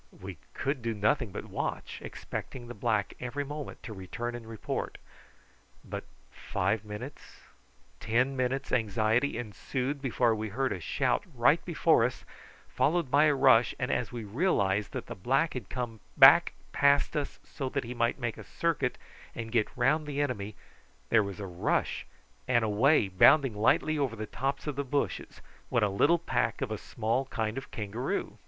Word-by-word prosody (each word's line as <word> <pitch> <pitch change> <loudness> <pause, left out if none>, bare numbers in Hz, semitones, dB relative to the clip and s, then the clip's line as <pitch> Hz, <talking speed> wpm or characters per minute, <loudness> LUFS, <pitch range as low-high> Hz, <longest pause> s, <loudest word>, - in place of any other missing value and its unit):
We 95 -2 -8 0.2
could 135 -1 -1
do 115 -1 -2
nothing 110 +4 +1
but - - -6
watch, - - -4
expecting 120 -2 -7
the 120 - -7
black 110 -2 0
every 125 +4 -3
moment 145 +1 -7
to 110 - -6
return 110 +5 -5
and 120 -2 -8
report. 110 -2 -4 0.9
But - - -6 0.3
five 100 +3 -1
minutes', 110 +7 -9 0.6
ten 130 +5 +1
minutes' 130 +1 -1
anxiety 115 +3 +1
ensued 130 +5 -3
before 120 -3 +2
we 110 0 -3
heard 130 +5 -1
a 95 - -5
shout 80 - 0
right - - +4
before - - +3
us, - - -2 0.4
followed 165 -3 +1
by 145 +2 +6
a 150 -2 +4
rush, 130 -3 +5
and 125 - -1
as 125 - -1
we 120 -2 -5
realised 105 - +1
that - - -4
the - - -6
black 135 - +1
had 125 -7 -6
come 120 -3 -4 0.2
back - - +8 0.2
past 140 - +3
us 145 -2 -2
so 135 -2 -5
that 140 +1 -2
he 120 +1 -6
might 115 0 +1
make 120 -4 -3
a - - -8
circuit 150 -6 -1 0.4
and 115 -1 -5
get 110 -2 +2
round 150 +5 +2
the 145 -1 -3
enemy, 110 -8 -2 0.6
there 115 - +6
was 100 -2 -5
a 100 - -4
rush, 90 -2 -1 0.4
and 120 -3 +3
away 110 +3 +4
bounding 130 +8 +5
lightly 145 +8 +2
over 130 -5 0
the 110 -1 -4
tops 135 +6 -3
of 150 -3 -3
the 140 - 0
bushes 140 +1 -2 0.3
went - - +3
a - - 0
little 145 +13 +4
pack 170 - -1
of 125 - -4
a 110 - -2
small 115 +5 -1
kind 110 -4 -2
of 135 - -6
kangaroo. 110 +5 -3
120 Hz, 175 wpm, -30 LUFS, 110-135 Hz, 0.9 s, back